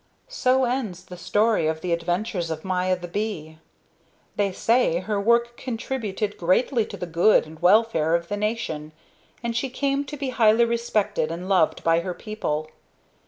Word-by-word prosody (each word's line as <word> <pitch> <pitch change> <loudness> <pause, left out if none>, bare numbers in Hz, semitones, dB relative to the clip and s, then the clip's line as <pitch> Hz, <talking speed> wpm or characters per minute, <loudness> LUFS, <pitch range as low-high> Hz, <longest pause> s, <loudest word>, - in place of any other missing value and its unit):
So 260 - +2
ends 240 -8 -3
the 180 - -10
story 205 +1 +1
of 160 0 -2
the 175 0 -1
adventures 175 +1 -2
of 160 +1 -5
Maya 185 0 0
the 175 0 -8
bee. 170 -5 -4 0.8
They 200 -1 +1
say 225 -3 +2
her 205 +1 -2
work 235 +2 +2
contributed 225 -4 -4
greatly 220 +7 +2
to - - -8
the - - -4
good 175 +5 +3
and 155 0 -13
welfare 180 -4 +4
of 170 0 -2
the 205 - -2
nation, 205 -8 -3 0.5
and 235 -1 -2
she 260 +3 -1
came 275 +2 -1
to 295 +2 -7
be 275 -1 -3
highly 235 -2 +4
respected 215 -7 0
and 170 +3 -5
loved 185 -5 +2
by 165 0 +3
her 180 +1 -4
people. 155 -8 -4
205 Hz, 165 wpm, -24 LUFS, 170-230 Hz, 0.8 s, welfare